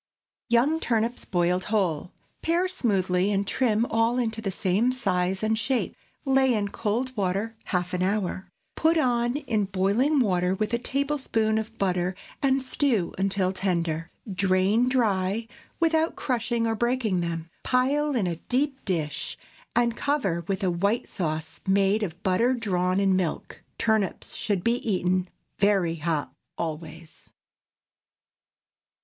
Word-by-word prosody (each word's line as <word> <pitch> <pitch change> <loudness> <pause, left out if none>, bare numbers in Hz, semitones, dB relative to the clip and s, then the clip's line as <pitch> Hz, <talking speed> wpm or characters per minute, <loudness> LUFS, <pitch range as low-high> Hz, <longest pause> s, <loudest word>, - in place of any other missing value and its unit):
YOUNG 260 +7 +3
TURNIPS 230 -3 -1
BOILED 180 0 +1
WHOLE. 180 -7 0 0.3
Pare 345 +3 +1
smoothly, 190 - +1
and 200 0 +1
trim 230 -2 +2
all 230 +1 +1
into 225 -2 -1
the 205 - -2
same 195 +6 +1
size 190 -6 0
and 220 0 +1
shape. 250 +3 -1 0.3
Lay 265 -2 +4
in 205 -1 -1
cold 240 +5 -2
water 200 +3 -1
half 180 -1 -1
an 180 - -1
hour. 190 -1 -1 0.3
Put 325 +1 +3
on 240 -3 +2
in 225 -8 0
boiling 200 +10 +2
water, 185 -5 +2
with 215 +3 -2
a 235 - +2
tablespoonful 260 -5 0
of 220 +1 -7
butter, 180 -2 0 0.3
and 270 -1 +2
stew 255 - 0
until 190 -1 +1
tender. 170 -4 -1 0.2
Drain 195 +5 +2
dry, 215 -3 +1 0.3
without 325 -1 +2
crushing 235 -2 -1
or 225 - +1
breaking 235 -4 0
them; 165 -1 -3
pile 280 +3 +1
in 220 -6 +1
a 170 -2 -2
deep 270 - -1
dish, 160 -6 -2 0.4
and 235 -1 +2
cover 250 - 0
with 195 +1 -2
a 185 - +2
white 200 +8 0
sauce 155 -3 -3
made 195 +2 +3
of 180 -2 -4
butter 230 +7 +2
drawn 185 -5 0
in 195 -1 +3
milk. 180 -4 -3
Turnips 220 -4 0
should 200 -5 -1
be 235 +1 +2
eaten 185 -4 0 0.3
very 195 -5 +2
hot 155 -2 -2 0.2
always. 160 0 -6
205 Hz, 140 wpm, -26 LUFS, 185-240 Hz, 0.4 s, Lay